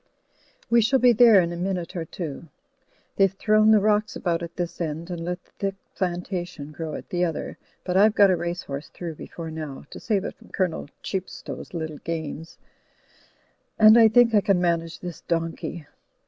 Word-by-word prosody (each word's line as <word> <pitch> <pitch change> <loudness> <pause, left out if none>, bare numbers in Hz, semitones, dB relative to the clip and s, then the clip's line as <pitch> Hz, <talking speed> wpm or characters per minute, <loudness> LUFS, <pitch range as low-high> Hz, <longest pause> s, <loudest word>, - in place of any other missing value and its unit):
We 235 -1 +4
shall 265 +5 +3
be 250 -1 +5
there 230 -3 +7
in 170 0 -2
a - - -4
minute 180 -1 -3
or 170 -2 -3
two. 160 -1 -7 0.7
They've 195 -2 +4
thrown 215 +2 +3
the 220 -1 +7
rocks 210 +1 +1
about 170 -2 -1
at 170 0 -7
this 175 -1 -4
end; 165 +2 -4
and 170 -1 -4
let 180 +1 -4
the - - -31
thick 195 -1 -1 0.2
plantation 175 -4 -4
grow 155 +1 -5
at - - -9
the 180 0 0
other, 165 -3 -3 0.2
but 180 - -2
I've 210 +3 +5
got 200 -2 +6
a - - +3
race 175 +1 -3
horse 140 +1 -6
through 170 -2 -6
before 165 +1 -8
now, 155 -4 -7
to - - -8
save 205 -3 -1
it - - -4
from - - -20
Colonel 180 -6 -2
Qiep 190 -1 -3
stow's - - -8
little 160 -2 -4
games, 165 -1 -5 1.2
and 215 0 +8
I 230 -1 +8
think 230 +1 +5
I 210 - +5
can 195 -2 +2
manage 170 -1 -1
this 175 -2 -7
donkey. 165 -1 -3
175 Hz, 190 wpm, -24 LUFS, 165-205 Hz, 1.2 s, and